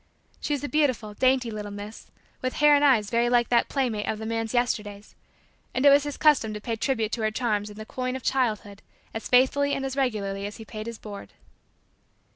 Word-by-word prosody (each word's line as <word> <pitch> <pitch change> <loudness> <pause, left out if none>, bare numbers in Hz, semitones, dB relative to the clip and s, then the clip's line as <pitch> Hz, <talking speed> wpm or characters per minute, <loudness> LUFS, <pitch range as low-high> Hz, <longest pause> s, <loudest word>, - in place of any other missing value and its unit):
She 295 - -2
was 285 - -6
a - - -1
beautiful, 255 -7 0
dainty, 255 0 +2
little 210 -1 -5
miss 205 +2 -9 0.3
with 255 0 -2
hair 295 0 +5
and 290 0 +4
eyes 230 -8 +4
very 235 +1 +2
like 240 -1 +2
that 240 -1 +3
playmate 240 -7 -1
of 215 - -1
the 220 - -6
man's 225 0 -2
Yesterdays 210 -4 -2 0.6
and 255 - +1
it 285 - +9
was 285 +1 +5
his 290 - -5
custom 275 -9 +3
to - - -5
pay 230 +2 -3
tribute 225 -2 -1
to 230 - -2
her 215 - +2
charms 215 -2 -1
in 205 - -12
the 215 - -7
coin 255 +2 -3
of 260 - -6
childhood 215 -6 -1 0.3
as 225 - -5
faithfully 280 +3 +3
and 270 - -3
as 265 -1 -4
regularly 200 -7 -1
as 205 - -9
he 225 - -10
paid 215 +1 -7
his 230 -1 -6
board. 205 -2 -10
230 Hz, 220 wpm, -26 LUFS, 215-260 Hz, 0.6 s, it